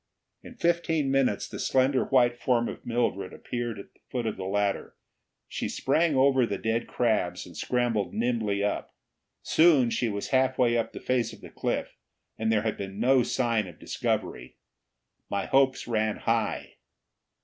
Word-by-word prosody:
In 250 - -12
fifteen 165 - +1
minutes 135 -7 +1
the - - -8
slender 130 0 +2
white 120 -3 +3
form 120 -1 +1
of - - -7
Mildred 115 -6 -1
appeared 120 -3 -4
at 100 - -11
the - - -30
foot 125 -2 -2
of 110 - -1
the 95 - -6
ladder. 100 0 -1 0.5
She - - -4
sprang 155 +3 +1
over 130 -1 +4
the 105 -4 -1
dead 115 +1 -1
crabs 110 -7 0
and - - -13
scrambled 120 -5 0
nimbly 110 -4 0
up. 105 - -2 0.5
Soon 150 -8 +4
she 120 - 0
was 100 -1 -4
halfway 130 -2 +2
up 115 -1 -1
the - - -7
face 120 -3 0
of 110 - -14
the - - -11
cliff, - - -3 0.4
and 110 0 0
there 105 -1 +2
had 110 -1 -1
been 100 0 -6
no 130 +2 +4
sign 115 -4 0
of 85 -3 -12
discovery. 60 +1 -3 0.7
My 100 - -1
hopes 135 -1 +2
ran 110 -2 0
high. - - -1
120 Hz, 165 wpm, -27 LUFS, 105-130 Hz, 0.7 s, over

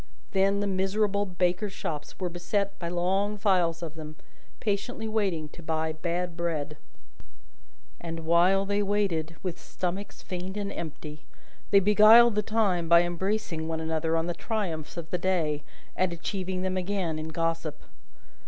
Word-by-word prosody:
Then, 195 +1 +2
the - - 0
miserable 200 +1 +1
bakers' 180 +2 0
shops 150 -6 -5
were 185 - -1
beset 195 +3 -2
by 170 - -3
long 190 +4 0
files 180 -5 +2
of 160 -3 -5
them, 155 -1 -8 0.4
patiently 220 +2 -2
waiting 195 -8 0
to 170 - -12
buy 160 -1 -1
bad 170 +2 -2
bread; 155 -3 -2 1.2
and 165 -1 -5
while 175 +4 +4
they 205 +1 +1
waited 195 -6 0
with 180 -3 -3
stomachs 185 +3 -4
faint 185 +2 -5
and 200 -1 -3
empty, 155 -1 -7 0.4
they 200 - +7
beguiled 215 +4 +7
the 210 - +2
time 200 -6 +1
by 170 0 +7
embracing 175 -1 -2
one 160 0 -2
another 160 0 0
on 165 - 0
the 175 - -1
triumphs 175 -8 -3
of 170 -2 -5
the 180 - 0
day, 165 -5 0 0.3
and 185 -1 +1
achieving 185 +2 -3
them 185 0 -1
again 185 -4 -1
in 155 - -4
gossip. 165 -1 -2
180 Hz, 155 wpm, -28 LUFS, 165-200 Hz, 1.2 s, they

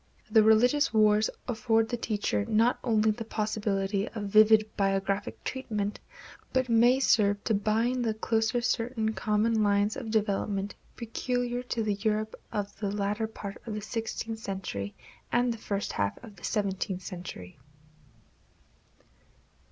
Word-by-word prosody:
The 220 - +7
religious 245 +8 +4
wars 215 -1 +4 0.2
afford 225 -2 +1
the - - -1
teacher 215 -3 -1
not 230 +2 +3
only 220 -3 +3
the 225 +2 -5
possibility 210 -2 -1
of 215 -3 -6
vivid 215 +1 +5
biographic 195 - -1
treatment, 210 -6 -3 0.5
but 260 -1 +1
may 240 +3 +5
serve 205 -6 +3
to 225 - +1
bind 225 +5 +1
the 220 -2 0
closer 225 +2 0
certain 230 -2 0
common 215 +1 +1
lines 205 0 +2
of 240 -5 -5
development 205 -2 0 0.2
peculiar 245 +1 -2
to 230 - 0
the 210 -1 +1
Europe 215 0 0 0.2
of 205 -1 -3
the 205 - -1
latter 205 +2 -1
part 200 -2 -8
of 215 - -3
the 210 - -4
sixteenth 225 +1 -4
century 190 - -5 0.4
and 240 0 +2
the 230 - -10
first 200 -1 -3
half 100 -1 -1
of 215 -4 -11
the 175 - -18
seventeenth 195 -2 -2
century. 155 - -8
215 Hz, 140 wpm, -29 LUFS, 200-230 Hz, 0.5 s, The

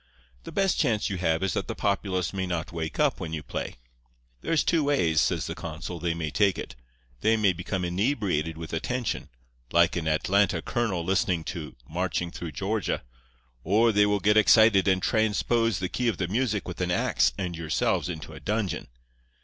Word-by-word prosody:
The - - -7
best 195 -1 +1
chance 110 -9 +1
you 95 - -2
have 80 0 +1
is 95 -3 0
that - - -2
the - - -4
populace 95 -2 -1
may 95 -1 -2
not 85 -3 -3
wake 80 -2 -4
up 150 -6 +2
when 85 -4 -5
you 75 -1 -4
play. - - -5 0.7
There's 160 - +1
two 165 -3 +2
ways,' 85 - +2
says - - 0
the - - -4
consul, 80 +2 -6
'they 85 0 -1
may 80 -2 -3
take 100 -1 +2
it. - - -7 0.4
They 110 +1 +3
may 100 -4 +3
become 90 +1 -3
inebriated 90 - 0
with 80 0 -7
attention, 120 +8 -2 0.4
like 85 +1 +4
an 85 -3 -2
Atlanta 90 +4 +2
colonel 100 -8 -1
listening 95 -2 +1
to 80 -5 -7
"Marching 90 +1 -2
Through 85 -3 -6
Georgia," 100 +5 -2 0.6
or 110 +6 +4
they 105 -1 +4
will 105 0 +1
get 105 +3 +3
excited 110 -2 +6
and 95 -1 +2
transpose 115 +1 +1
the 90 - -2
key 125 +6 -2
of 115 - +1
the 90 - -1
music 110 +1 -1
with 90 0 -6
an 90 - 0
axe 60 -8 +2
and 90 -2 -3
yourselves 80 +2 0
into 80 -3 -6
a - - -9
dungeon. 105 -2 -2
95 Hz, 190 wpm, -27 LUFS, 85-110 Hz, 0.7 s, excited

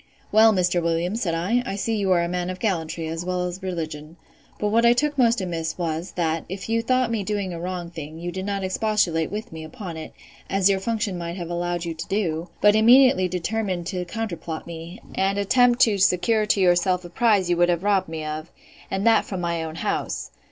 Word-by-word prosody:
Well, 220 +1 +7
Mr. 180 -3 +1
Williams, 170 +6 -1
said 165 -4 0
I, 195 +9 +1
I 220 - -4
see 225 +3 -1
you 200 -3 0
are 175 -2 +4
a - - -1
man 180 0 -2
of 185 - -4
gallantry, 165 -6 -2
as 165 +1 -4
well 180 0 -1
as 180 +2 -5
religion: 160 -3 -5 0.4
But 210 - 0
what 230 +2 +3
I 235 0 +6
took 295 +4 0
most 235 -3 +3
amiss 165 -3 -3
was, 170 0 -3
that, 165 -2 -1
if 190 +3 -6
you 230 0 +2
thought 255 0 +1
me 225 -2 0
doing 200 -2 -2
a 170 - -6
wrong 175 -1 -5
thing, 155 -1 -8
you 175 +1 -5
did 190 +2 -5
not 200 -1 -2
expostulate 185 -5 0
with 210 +2 -5
me 160 0 -7
upon 165 +2 -7
it, 160 - -7 0.4
as 195 0 +3
your 195 - +1
function 210 -3 -2
might 170 +1 -5
have 175 -2 -5
allowed 175 0 -2
you 165 - -3
to 160 - -7
do; 175 -4 -1
but 210 +1 +6
immediately 235 -3 +6
determined 185 0 -2
to 180 0 -3
counterplot 170 -5 -5
me, 170 +4 -8
and 195 +1 0
attempt 245 +5 +3
to 215 -5 +4
secure 210 +4 +3
to 205 - +2
yourself 180 0 +2
a - - -8
prize 210 -4 +3
you 175 -1 +1
would 175 0 +4
have 175 0 0
robbed 195 -3 +2
me 160 -1 -5
of, 155 +1 -5 0.4
and 195 +2 -2
that 225 -1 +5
from 190 - -5
my 170 -1 -1
own 160 0 -6
house. - - -3
185 Hz, 220 wpm, -24 LUFS, 170-210 Hz, 0.4 s, Well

